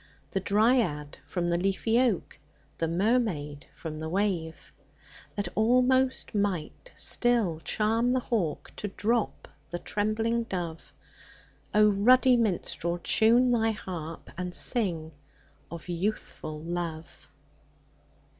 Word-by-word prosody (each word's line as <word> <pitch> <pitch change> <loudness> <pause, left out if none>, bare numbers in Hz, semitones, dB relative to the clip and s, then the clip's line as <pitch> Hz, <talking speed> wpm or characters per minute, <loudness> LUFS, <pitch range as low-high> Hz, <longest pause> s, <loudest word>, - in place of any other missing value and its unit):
The 195 - 0
dryad 205 - +1
from 175 -2 -1
the 170 - +1
leafy 195 +5 +1
oak, 240 -8 0 0.4
The 165 - +1
mermaid 170 - 0
from 155 -2 -7
the 160 0 -4
wave; 175 -4 -2 0.6
That 205 -3 -2
almost 255 +4 +3
might 200 - -2
still 230 -10 +1
charm 225 +7 +1
the 255 - +2
hawk 210 -11 -2
To 210 - -3
drop 225 +3 -1 0.2
the 175 - -3
trembling 220 +5 -1
dove? 175 -6 -5 0.8
ruddy 215 +5 +5
minstrel, 175 -6 -1
time 235 +7 +4
thy 225 -2 +3
harp. 165 -6 -7
And 180 -1 -4
sing 170 -10 0 0.6
of 170 +1 -8
Youthful 175 -4 -3
Love 165 -2 -5
200 Hz, 110 wpm, -28 LUFS, 170-230 Hz, 0.8 s, ruddy